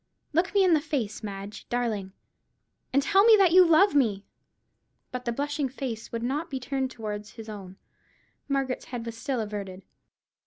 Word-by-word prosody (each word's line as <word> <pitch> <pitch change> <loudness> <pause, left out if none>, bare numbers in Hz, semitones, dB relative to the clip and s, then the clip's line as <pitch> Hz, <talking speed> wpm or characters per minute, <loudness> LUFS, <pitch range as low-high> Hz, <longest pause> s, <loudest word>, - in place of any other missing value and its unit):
Look 360 +6 +1
me 395 - +6
in 365 -2 +5
the 310 - +4
face, 265 -9 -3
Madge 200 -1 -7
darling, 220 -6 -2 0.8
and 275 +1 +3
tell 390 +5 +5
me 445 -1 +8
that 380 -4 +5
you 370 +1 +8
love 360 +4 +5
me." 220 -8 +2 0.9
But 250 0 -5
the 235 - 0
blushing 285 +2 -2
face 250 -4 -5
would 230 0 -3
not 295 +7 -2
be 265 - -3
turned 265 +1 -2
towards 210 -3 -6
his 225 -1 -10
own. 195 -3 -9 0.7
Margaret's 270 -2 -1
head 240 -2 -6
was 230 -1 -5
still 255 +2 -2
averted. 200 -3 -5
250 Hz, 170 wpm, -27 LUFS, 215-290 Hz, 0.9 s, me